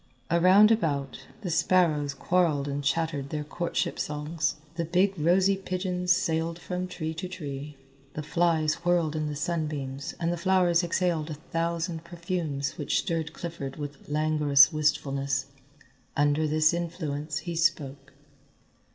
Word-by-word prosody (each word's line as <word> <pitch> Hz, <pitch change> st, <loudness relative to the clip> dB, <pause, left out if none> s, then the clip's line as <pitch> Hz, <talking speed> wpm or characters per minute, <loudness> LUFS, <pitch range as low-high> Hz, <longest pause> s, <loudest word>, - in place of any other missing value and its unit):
Around 185 Hz, +5 st, +6 dB
about, 145 Hz, -, -1 dB
the 180 Hz, -5 st, -3 dB
sparrows 155 Hz, -5 st, +2 dB
quarrelled 165 Hz, -6 st, +1 dB
and 145 Hz, 0 st, -3 dB
chattered 140 Hz, 0 st, -1 dB
their 150 Hz, 0 st, -3 dB
courtship 170 Hz, +3 st, -2 dB
songs, 150 Hz, +1 st, -2 dB, 0.2 s
the 170 Hz, 0 st, -2 dB
big 180 Hz, +4 st, +2 dB
rosy 185 Hz, +4 st, +3 dB
pigeons 180 Hz, -1 st, -2 dB
sailed 165 Hz, -2 st, +1 dB
from 180 Hz, +1 st, -4 dB
tree 160 Hz, -3 st, -4 dB
to 160 Hz, +3 st, -5 dB
tree, 145 Hz, -5 st, -7 dB, 0.4 s
the 155 Hz, -, -4 dB
flies 165 Hz, 0 st, +1 dB
whirled 170 Hz, -3 st, +2 dB
in 155 Hz, -1 st, -1 dB
the 150 Hz, -, -4 dB
sunbeams 150 Hz, -4 st, -3 dB
and 170 Hz, 0 st, 0 dB
the -, -, -3 dB
flowers 175 Hz, 0 st, +3 dB
exhaled 170 Hz, -2 st, 0 dB
a 155 Hz, -, -4 dB
thousand 165 Hz, +1 st, -3 dB
perfumes 170 Hz, -5 st, -3 dB
which -, -, 0 dB
stirred 165 Hz, -3 st, -1 dB
Clifford 160 Hz, -7 st, -6 dB
with 145 Hz, -2 st, -8 dB
languorous 150 Hz, -1 st, +4 dB
wistfulness. 140 Hz, -3 st, 0 dB, 0.7 s
Under 145 Hz, +2 st, +2 dB
this 155 Hz, +1 st, +3 dB
influence 155 Hz, -4 st, -3 dB
he 170 Hz, -1 st, -3 dB
spoke. 145 Hz, -5 st, -1 dB
160 Hz, 135 wpm, -27 LUFS, 145-175 Hz, 0.7 s, Around